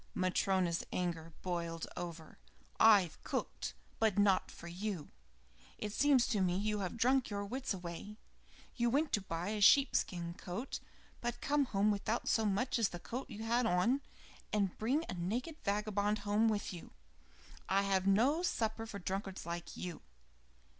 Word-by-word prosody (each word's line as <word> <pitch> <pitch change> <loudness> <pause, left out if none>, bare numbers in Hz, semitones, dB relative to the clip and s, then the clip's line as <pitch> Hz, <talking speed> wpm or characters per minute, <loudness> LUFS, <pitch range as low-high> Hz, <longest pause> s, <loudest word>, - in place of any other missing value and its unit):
Matryona's 185 -2 +1
anger 165 -2 -2
boiled 170 -2 -2
over. 165 -2 -7 0.4
"I've 205 -7 +5
cooked, - - -3 0.2
but 220 -3 +2
not 200 -2 +4
for 170 - -10
you. 180 -2 -4 0.7
It 210 -1 -4
seems 275 -2 +4
to 210 -6 +1
me 180 -1 +2
you 210 +1 0
have 190 +2 -3
drunk 255 +2 +3
your 205 -1 -3
wits 260 +6 -3
away. 185 +2 -5 0.6
You 240 -1 +2
went 290 +5 +1
to 210 - +3
buy 175 0 -3
a 215 -1 -2
sheep 275 +7 +6
skin 170 -2 -1
coat, 180 +9 -5 0.4
but 240 0 -3
come 285 +2 +2
home 205 -2 +2
without 210 +3 -1
so 225 - +3
much 235 +5 +1
as 225 - +3
the 175 - -6
coat 250 +8 -5
you 215 - -6
had 235 +1 +2
on, 225 +10 +2 0.5
and 200 -3 +1
bring 270 +9 +1
a - - -4
naked 230 - -3
vagabond 210 0 +1
home 210 +2 +3
with 205 -3 -1
you. 175 - -10 0.8
I 195 +1 +3
have 195 -1 +1
no 250 - +4
supper 225 -9 -1
for 210 - -6
drunkards 195 0 -4
like 170 0 -5
you." 175 -4 -5
205 Hz, 160 wpm, -35 LUFS, 180-230 Hz, 0.8 s, sheep